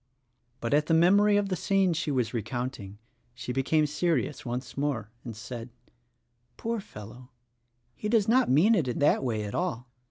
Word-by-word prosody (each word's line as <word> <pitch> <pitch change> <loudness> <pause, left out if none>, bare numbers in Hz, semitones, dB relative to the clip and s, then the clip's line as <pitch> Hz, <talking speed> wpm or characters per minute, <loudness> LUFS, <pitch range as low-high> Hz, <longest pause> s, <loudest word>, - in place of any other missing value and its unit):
But 115 +3 -1
at 150 +1 +3
the 165 - +3
memory 200 +5 +5
of 205 -1 0
the 185 - 0
scene 195 0 +1
she 160 -1 -2
was 125 -5 0
recounting 115 -3 -4 0.4
she 125 0 -5
became 150 +4 +2
serious 150 0 -1
once 125 0 -5
more 135 -7 -2
and 115 -3 -7
said: 115 +2 -7 0.9
"Poor 230 0 -2
fellow, 120 - -11 0.6
he 210 - -5
does 215 -3 +3
not 255 +3 +3
mean 160 - +5
it 170 - +1
in 120 - -2
that 145 - +3
way 110 -4 -1
at 105 - -6
all. 165 -10 -2
140 Hz, 170 wpm, -28 LUFS, 120-180 Hz, 0.9 s, memory